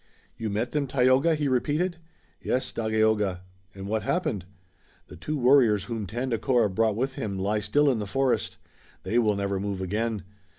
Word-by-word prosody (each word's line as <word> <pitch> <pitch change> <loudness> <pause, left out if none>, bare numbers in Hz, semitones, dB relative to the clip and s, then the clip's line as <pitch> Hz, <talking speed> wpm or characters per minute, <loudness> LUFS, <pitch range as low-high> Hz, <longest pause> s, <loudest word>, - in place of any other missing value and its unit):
"You 110 -1 -4
met 110 +4 -2
them, 145 -2 -1
Tayoga?" 130 +5 +3
he 150 -1 -1
repeated. 150 +7 0 0.4
"Yes, 130 - -1
Dagaeoga." 110 -4 +1 0.3
"And 95 0 -7
what 110 +1 -1
happened?" 105 - -1 0.6
"The - - -10
two 155 0 -4
warriors 120 -6 +4
whom 110 -2 -4
Tandakora 120 0 0
brought 110 +2 +1
with 130 +4 -1
him 100 -6 -4
lie 100 +3 0
still 145 +7 +2
in 130 -5 +2
the 105 - -4
forest. 135 +5 0 0.5
They 110 +6 +1
will 105 -3 +2
never 100 -1 -1
move 100 -1 -3
again. 105 +3 -2
115 Hz, 165 wpm, -26 LUFS, 105-130 Hz, 0.6 s, warriors